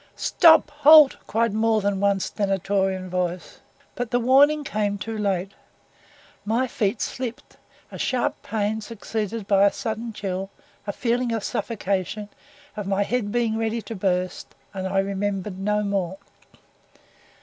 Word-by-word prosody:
"Stop! 320 -2 +5
halt!" 300 -1 +8
shouted 230 -1 +1
more 220 0 +2
than 200 -1 -1
one 200 0 +2
stentorian 195 -1 -1
voice; 180 -1 -3 0.3
but 245 -2 -4
the 245 - +1
warning 285 +5 +4
came 210 -5 -1
too 225 +2 -5
late. 195 -3 -1 0.9
My 225 +5 +1
feet 215 -3 -1
slipped 245 -2 -5 0.3
a - - -8
sharp 255 -2 -1
pain 215 0 -2
succeeded 220 -1 -4
by 200 -1 +4
a 200 - +5
sudden 225 0 -4
chill 195 -2 -4 0.4
a - - 0
feeling 240 +2 -1
of 225 -3 -2
suffocation 205 -1 -3 0.5
of 210 -2 -5
my 195 +1 +1
head 220 -1 -2
being 225 -1 0
ready 225 +1 -1
to 225 - -7
burst 185 -2 -2 0.2
and 190 -1 -3
I 195 +1 -2
remembered 195 0 -2
no 210 +2 0
more. 195 -2 -2
210 Hz, 140 wpm, -24 LUFS, 195-230 Hz, 0.9 s, halt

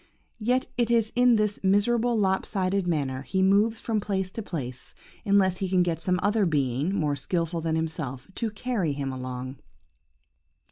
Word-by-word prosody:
Yet 250 +4 +1
it 240 -2 +1
is 230 -2 +2
in 245 -1 +5
this 210 -1 0
miserable 225 +5 +2
lop 190 -2 +2
sided 190 -2 -1
manner 140 -6 -1
he 190 +7 0
moves 210 +4 +3
from 220 -2 -1
place 190 -2 -2
to 225 - -5
place, 130 - -6 0.3
unless 195 -3 +3
he 190 -1 -2
can 185 -1 +3
get 165 -2 -2
some 180 +2 +1
other 205 -1 +2
being, 145 +3 0
more 150 -5 0
skilful 165 +4 -2
than 160 0 -1
himself, 155 -6 -4
to 230 +2 -2
carry 210 - -2
him 140 -1 -3
along. 130 +1 -6
190 Hz, 170 wpm, -26 LUFS, 150-210 Hz, 0.3 s, in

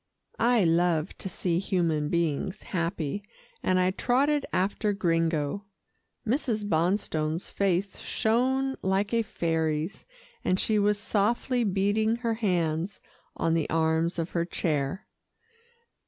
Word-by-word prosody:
I 235 -2 +4
love 170 0 +2
to 190 - -4
see 175 -2 -1
human 165 -6 0
beings 170 +4 -1
happy, 170 -1 -2 0.4
and 185 0 +2
I 185 0 +3
trotted 275 +8 +1
after 205 +2 0
Gringo. 165 -1 0 0.6
Mrs. 225 -3 0
Bonstone's 165 -2 0
face 195 0 0
shone 265 +4 +1
like 195 +3 0
a 230 - +3
fairy's, 160 -3 -1 0.4
and 185 - +1
she 215 -1 +2
was 205 0 +3
softly 235 +4 +1
beating 205 +2 +1
her 235 -1 -1
hands 180 -4 -1 0.4
on 165 - +1
the 165 -2 0
arms 160 +1 +1
of 165 0 -2
her 170 - 0
chair. 155 0 -2
185 Hz, 120 wpm, -28 LUFS, 165-215 Hz, 0.6 s, I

